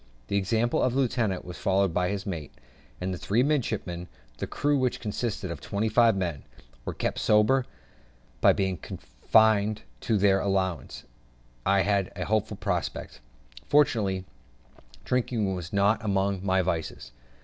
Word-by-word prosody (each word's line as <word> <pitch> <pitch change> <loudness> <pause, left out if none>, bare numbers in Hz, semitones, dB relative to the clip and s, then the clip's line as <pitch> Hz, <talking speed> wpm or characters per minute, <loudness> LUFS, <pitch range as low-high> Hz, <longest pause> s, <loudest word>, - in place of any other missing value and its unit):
The - - -1
example 110 +5 +1
of 125 -1 +1
the - - +2
lieutenant 115 -7 0
was 90 -1 -8
followed 95 -2 +2
by 90 +1 +1
his 100 -1 -3
mate, 85 -8 -5 0.4
and 90 -1 -3
three 115 +5 +2
midshipmen; 110 - -1 0.3
the - - -3
crew, 145 0 0
which 130 -3 0
consisted 105 -3 -3
of 80 -4 -7
twenty 105 +6 -1
five 115 -1 +4
men, 85 -7 -2 0.4
were - - -4
kept - - -2
sober 110 +5 +3 0.7
by - - +7
being 95 -2 0
confined 105 - +1 0.2
to 110 - 0
their 100 -1 +4
allowance, 95 -3 -1
and - - -28 0.6
I 100 0 +4
had 100 -2 +1
a - - -3
hopeful 110 -1 0
prospect. - - -3 0.5
Fortunately, 105 -10 +2 0.8
drinking 115 -5 0
was 90 -1 -6
not 100 +3 +2
among 100 -2 0
my 95 -1 +2
vices. 80 -8 -3
100 Hz, 150 wpm, -27 LUFS, 95-110 Hz, 0.8 s, by